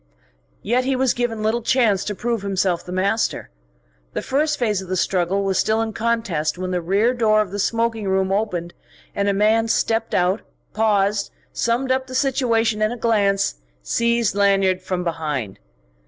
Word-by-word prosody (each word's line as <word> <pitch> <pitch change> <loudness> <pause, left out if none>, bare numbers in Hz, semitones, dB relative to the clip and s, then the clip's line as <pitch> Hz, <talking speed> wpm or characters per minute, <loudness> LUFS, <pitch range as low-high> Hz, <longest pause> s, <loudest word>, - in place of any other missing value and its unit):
Yet 245 +5 +1
he 265 +1 0
was 260 -1 +2
given 230 -3 -2
little 225 +2 +1
chance 225 -6 +2
to 205 - -3
prove 230 +1 -2
himself 190 -3 0
the 180 - -9
master. 195 - -1 0.6
The - - -3
first 300 +3 0
phase 210 -5 0
of 190 - -9
the 185 - -1
struggle 185 +2 0
was 195 -1 0
still 220 +1 +2
in 225 -1 -2
contest 210 -10 -1
when 185 0 -4
the 180 -1 -1
rear 200 +8 +2
door 220 -3 +3
of 210 -4 -1
the 205 - -4
smoking 225 0 0
room 190 0 +1
opened 180 -4 -2 0.4
and 200 0 0
a - - +3
man 215 +3 +2
stepped 225 0 0
out, 180 +3 +1 0.3
paused, 205 -2 +1 0.2
summed 245 +3 0
up 260 0 0
the 255 - -7
situation 230 -5 +1
in 215 +1 +2
a 245 - -5
glance, 200 - +1 0.3
seized 235 - +1
Lanyard 195 -2 +2
from 185 -1 -3
behind. 150 - -3
210 Hz, 175 wpm, -21 LUFS, 190-230 Hz, 0.6 s, door